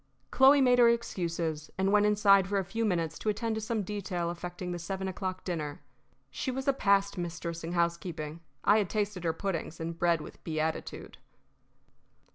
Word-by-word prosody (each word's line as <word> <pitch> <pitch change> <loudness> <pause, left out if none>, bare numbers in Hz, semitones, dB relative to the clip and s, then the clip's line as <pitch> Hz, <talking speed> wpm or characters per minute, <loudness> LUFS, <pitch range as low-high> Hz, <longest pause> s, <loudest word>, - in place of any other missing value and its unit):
Chloe 275 +2 +6
made 250 -1 +5
her 235 -1 +7
excuses, 170 -9 -2
and 190 +1 +2
went 210 0 +5
inside 200 -2 +5
for 200 +1 0
a 195 - 0
few 225 +5 -2
minutes 170 -6 -1
to 215 - -1
attend 225 +2 -1
to 220 - -3
some 220 -1 -1
detail 185 -4 -3
affecting 175 +1 -6
the 175 - -4
seven 190 +3 -4
o'clock 185 0 -4
dinner. 155 -5 -4 0.5
She - - -3
was 265 +1 -3
a 275 - +5
passed 200 -5 +2
mistress 170 -1 -4
in 165 +2 -4
housekeeping. 170 -2 -2 0.2
I 210 +2 +5
had 200 -4 -1
tasted 205 -4 -2
her 165 - +3
puddings 170 -2 -4
and 165 0 -5
bread 170 -1 +3
with 150 - -11
beatitude. 160 0 -3
185 Hz, 180 wpm, -30 LUFS, 170-210 Hz, 0.5 s, her